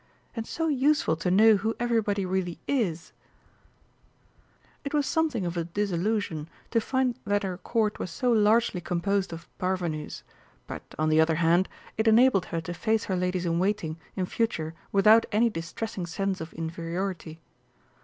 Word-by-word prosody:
And 225 Hz, -1 st, -4 dB
so 325 Hz, 0 st, -2 dB
useful 285 Hz, -, +2 dB
to 165 Hz, +2 st, -1 dB
know 215 Hz, +3 st, +6 dB
who 220 Hz, +3 st, -1 dB
everybody 220 Hz, -5 st, +1 dB
really 180 Hz, -2 st, -2 dB
is!" 195 Hz, -, -1 dB, 1.7 s
It 280 Hz, +1 st, -3 dB
was 290 Hz, -1 st, +2 dB
something 305 Hz, -, 0 dB
of 170 Hz, 0 st, -3 dB
a 170 Hz, -, 0 dB
disillusion 180 Hz, -3 st, -1 dB, 0.2 s
to 230 Hz, -, +2 dB
find 260 Hz, 0 st, 0 dB
that 205 Hz, 0 st, 0 dB
her 185 Hz, -2 st, -3 dB
Court 215 Hz, +2 st, 0 dB
was -, -, -3 dB
so 245 Hz, +9 st, 0 dB
largely 215 Hz, -3 st, +3 dB
composed 190 Hz, +3 st, -1 dB
of 165 Hz, 0 st, -8 dB
parvenus, 175 Hz, -5 st, -2 dB, 0.4 s
but, -, -, -6 dB, 0.2 s
on 155 Hz, 0 st, +1 dB
the 155 Hz, 0 st, +5 dB
other 160 Hz, 0 st, +3 dB
hand, 170 Hz, +3 st, +3 dB, 0.3 s
it 220 Hz, -, +2 dB
enabled 220 Hz, -4 st, +5 dB
her 165 Hz, -, -3 dB
to 175 Hz, +2 st, -5 dB
face 220 Hz, +5 st, 0 dB
her 190 Hz, -, -2 dB
ladies 180 Hz, 0 st, -1 dB
in 170 Hz, 0 st, +1 dB
waiting 180 Hz, -5 st, -1 dB, 0.2 s
in 185 Hz, -, -1 dB
future 170 Hz, -7 st, -2 dB, 0.2 s
without 215 Hz, +3 st, +6 dB
any 225 Hz, +2 st, +3 dB
distressing 180 Hz, +2 st, -5 dB
sense 190 Hz, +2 st, -2 dB
of 160 Hz, 0 st, -6 dB
inferiority. 165 Hz, +1 st, -4 dB
190 Hz, 160 wpm, -27 LUFS, 170-225 Hz, 1.7 s, know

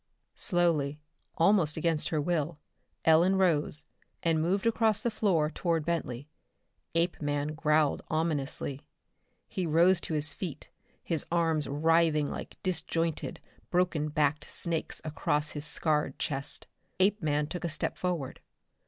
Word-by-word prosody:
Slowly, 160 Hz, -6 st, +1 dB, 0.4 s
almost 170 Hz, -3 st, +3 dB
against 160 Hz, -1 st, +1 dB
her 155 Hz, -, 0 dB
will, 160 Hz, 0 st, -1 dB, 0.5 s
Ellen 170 Hz, +4 st, +5 dB
rose 160 Hz, -5 st, +2 dB, 0.4 s
and 165 Hz, -2 st, +2 dB
moved 190 Hz, +6 st, 0 dB
across 225 Hz, -1 st, +3 dB
the 235 Hz, -, +1 dB
floor 175 Hz, -8 st, +1 dB
toward 165 Hz, -3 st, -1 dB
Bentley. 145 Hz, -6 st, -2 dB, 0.7 s
Apeman 150 Hz, -3 st, 0 dB
growled 155 Hz, -1 st, +2 dB
ominously. 145 Hz, -3 st, -2 dB, 0.7 s
He 185 Hz, -3 st, -3 dB
rose 170 Hz, +3 st, +4 dB
to 160 Hz, -, -3 dB
his 150 Hz, 0 st, +2 dB
feet, 175 Hz, -7 st, -7 dB, 0.3 s
his 165 Hz, -4 st, -2 dB
arms 165 Hz, -3 st, +1 dB
writhing 160 Hz, +1 st, +3 dB
like -, -, -6 dB
disjoined, 165 Hz, -3 st, -1 dB, 0.3 s
broken 175 Hz, -4 st, +1 dB
backed 150 Hz, 0 st, 0 dB
snakes 170 Hz, -2 st, 0 dB
across 150 Hz, 0 st, 0 dB
his 150 Hz, 0 st, -5 dB
scarred 150 Hz, -1 st, +1 dB
chest. 140 Hz, -3 st, -1 dB, 0.3 s
Apeman 165 Hz, -7 st, +2 dB
took 180 Hz, +4 st, -6 dB
a 170 Hz, -, -1 dB
step 155 Hz, -, -1 dB
forward. 175 Hz, -8 st, -3 dB
160 Hz, 125 wpm, -29 LUFS, 150-175 Hz, 0.7 s, Ellen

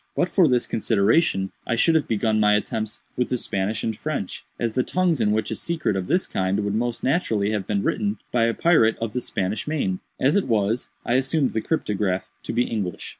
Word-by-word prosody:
But 180 Hz, -, +1 dB
for 175 Hz, -1 st, +4 dB
this 125 Hz, -3 st, +2 dB
consideration 105 Hz, -, +2 dB, 0.2 s
I 120 Hz, -, +1 dB
should 165 Hz, +8 st, +3 dB
have 160 Hz, -3 st, +2 dB
begun 110 Hz, 0 st, +1 dB
my 105 Hz, 0 st, +5 dB
attempts 110 Hz, +1 st, -3 dB
with 125 Hz, -, 0 dB
the 125 Hz, -, 0 dB
Spanish 100 Hz, -1 st, -2 dB
and 110 Hz, -, -1 dB
French, 140 Hz, -6 st, -4 dB, 0.2 s
as 115 Hz, -2 st, -1 dB
the 130 Hz, -, +2 dB
tongues 175 Hz, +1 st, +1 dB
in 105 Hz, -, +3 dB
which 110 Hz, +1 st, 0 dB
a -, -, -1 dB
secret 160 Hz, -, -1 dB
of 95 Hz, -1 st, -2 dB
this 185 Hz, -, +2 dB
kind 95 Hz, +1 st, -1 dB
would 100 Hz, -1 st, -1 dB
most 120 Hz, +2 st, -2 dB
naturally 115 Hz, -, +1 dB
have 105 Hz, -3 st, -2 dB
been 100 Hz, -1 st, 0 dB
written 205 Hz, 0 st, 0 dB
by 120 Hz, -2 st, +3 dB
a 115 Hz, -, 0 dB
pirate 155 Hz, -10 st, +4 dB
of 115 Hz, -2 st, -4 dB
the 125 Hz, -, -1 dB
Spanish 100 Hz, +1 st, -3 dB
main. 135 Hz, -12 st, -1 dB, 0.2 s
As 140 Hz, +7 st, +3 dB
it 200 Hz, -, +2 dB
was, 110 Hz, +1 st, 0 dB, 0.2 s
I 120 Hz, -, 0 dB
assumed 135 Hz, +1 st, +1 dB
the 110 Hz, -, -1 dB
cryptograph 105 Hz, -, -1 dB
to -, -, -5 dB
be 120 Hz, +1 st, +2 dB
English. 100 Hz, -8 st, -4 dB
115 Hz, 220 wpm, -24 LUFS, 105-135 Hz, 0.2 s, my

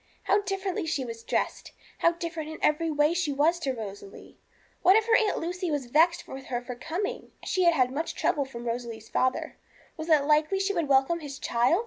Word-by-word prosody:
How 410 Hz, -, +3 dB
differently 385 Hz, -2 st, -3 dB
she 280 Hz, -5 st, -1 dB
was 230 Hz, -1 st, -7 dB
dressed! -, -, -2 dB, 0.3 s
How 335 Hz, -, +4 dB
different 335 Hz, -2 st, -5 dB
in 315 Hz, -, -7 dB
every 315 Hz, +2 st, +2 dB
way 300 Hz, +1 st, +3 dB
she 345 Hz, -4 st, 0 dB
was 310 Hz, +5 st, +2 dB
to 280 Hz, -5 st, -1 dB
Rosalie! 200 Hz, -4 st, -9 dB, 0.4 s
What 375 Hz, -, +6 dB
if 440 Hz, 0 st, +4 dB
her 460 Hz, 0 st, +4 dB
Aunt 440 Hz, -3 st, +2 dB
Lucy 355 Hz, +2 st, -3 dB
was 290 Hz, -4 st, -1 dB
vexed 335 Hz, +7 st, +3 dB
with 265 Hz, 0 st, -8 dB
her 245 Hz, -2 st, -2 dB
for 250 Hz, -, -6 dB
coming? 350 Hz, -, -4 dB
She 370 Hz, -2 st, +1 dB
had 340 Hz, -1 st, +5 dB
had 255 Hz, -3 st, +2 dB
much 315 Hz, +5 st, -3 dB
trouble 285 Hz, -2 st, +1 dB
from 240 Hz, -3 st, -9 dB
Rosalie's 230 Hz, -2 st, -5 dB
father; 255 Hz, 0 st, 0 dB, 0.4 s
was 315 Hz, +1 st, -6 dB
it 305 Hz, -3 st, +5 dB
likely 305 Hz, +6 st, +2 dB
she 390 Hz, +1 st, 0 dB
would 335 Hz, -5 st, 0 dB
welcome 275 Hz, +5 st, +3 dB
his 285 Hz, -4 st, -7 dB
child? 245 Hz, +10 st, +2 dB
310 Hz, 205 wpm, -27 LUFS, 260-345 Hz, 0.4 s, What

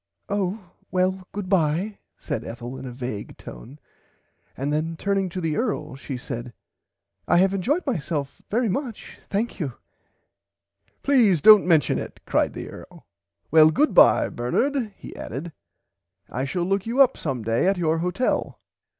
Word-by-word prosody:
Oh 200 Hz, 0 st, -1 dB, 0.3 s
well 185 Hz, 0 st, 0 dB
goodbye 190 Hz, 0 st, 0 dB, 0.2 s
said -, -, -4 dB
Ethel 120 Hz, +2 st, -7 dB
in 130 Hz, 0 st, -7 dB
a -, -, -6 dB
vage 120 Hz, -4 st, -6 dB
tone 135 Hz, +6 st, -11 dB, 0.8 s
and 140 Hz, +3 st, -1 dB
then 160 Hz, +2 st, -1 dB
turning 195 Hz, 0 st, 0 dB
to 185 Hz, -, -5 dB
the 160 Hz, -3 st, -1 dB
earl 155 Hz, -, -2 dB
she 135 Hz, -1 st, -6 dB
said 120 Hz, -1 st, -6 dB
[Pg 125 Hz, -, -10 dB, 0.8 s
87] 175 Hz, -, +4 dB
I -, -, +6 dB
have 190 Hz, +2 st, +4 dB
enjoyed 275 Hz, -, 0 dB
myself 150 Hz, -, -3 dB
very 235 Hz, +3 st, +1 dB
much 235 Hz, +2 st, -4 dB
thankyou. 200 Hz, -, -2 dB, 1.3 s
Please 235 Hz, -, +4 dB
dont 210 Hz, +4 st, +8 dB
mention 160 Hz, -7 st, +3 dB
it -, -, -8 dB
cried -, -, +1 dB
the -, -, -6 dB
earl -, -, -12 dB, 0.5 s
well 155 Hz, 0 st, +8 dB
goodbye 300 Hz, -, +5 dB
Bernard 235 Hz, -, -1 dB
he -, -, -10 dB
added 145 Hz, +9 st, -6 dB, 0.8 s
I 130 Hz, +2 st, -2 dB
shall 170 Hz, +6 st, -2 dB
look 195 Hz, +3 st, 0 dB
you 240 Hz, +4 st, -1 dB
up 270 Hz, -3 st, +6 dB
some 130 Hz, -7 st, -3 dB
day 115 Hz, -, +1 dB
at 195 Hz, 0 st, +2 dB
your 165 Hz, -2 st, +1 dB
hotel. 180 Hz, +9 st, -1 dB
175 Hz, 150 wpm, -24 LUFS, 140-205 Hz, 1.3 s, dont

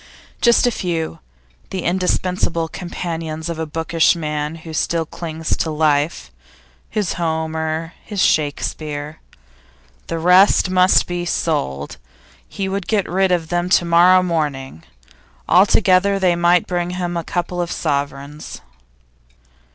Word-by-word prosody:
Just 235 Hz, 0 st, +4 dB
a 245 Hz, -, +3 dB
few, 165 Hz, -, -3 dB, 0.5 s
the 185 Hz, -, -4 dB
indispensable 180 Hz, -2 st, 0 dB
companions 165 Hz, -2 st, -5 dB
of 165 Hz, -1 st, -4 dB
a 160 Hz, -, -3 dB
bookish 165 Hz, +2 st, +2 dB
man 150 Hz, -1 st, -3 dB
who 160 Hz, 0 st, -10 dB
still 165 Hz, +1 st, 0 dB
clings 160 Hz, -1 st, -4 dB
to 160 Hz, -, -1 dB
life 150 Hz, 0 st, 0 dB, 0.6 s
his 210 Hz, -4 st, -1 dB
Homer, 160 Hz, 0 st, -2 dB
his 205 Hz, -2 st, -6 dB
Shakespeare 150 Hz, -1 st, -1 dB, 0.9 s
The 165 Hz, -, -3 dB
rest 185 Hz, +2 st, +4 dB
must 185 Hz, 0 st, +4 dB
be 175 Hz, 0 st, -3 dB
sold. 70 Hz, -, -2 dB, 0.5 s
He 195 Hz, -, -3 dB
would 195 Hz, -1 st, -3 dB
get 210 Hz, -3 st, 0 dB
rid 190 Hz, +1 st, +1 dB
of 165 Hz, -3 st, 0 dB
them 175 Hz, 0 st, -1 dB
to 175 Hz, -, +3 dB
morrow 175 Hz, +2 st, +5 dB
morning. 145 Hz, -, -2 dB, 0.7 s
All 185 Hz, +4 st, +5 dB
together 195 Hz, 0 st, +3 dB
they 185 Hz, -3 st, +2 dB
might 175 Hz, +1 st, +3 dB
bring 175 Hz, -1 st, -2 dB
him 175 Hz, -1 st, -3 dB
a 170 Hz, -, -2 dB
couple 175 Hz, +1 st, -3 dB
of 170 Hz, -, -3 dB
sovereigns. 140 Hz, +1 st, -4 dB
170 Hz, 130 wpm, -19 LUFS, 155-180 Hz, 0.9 s, morrow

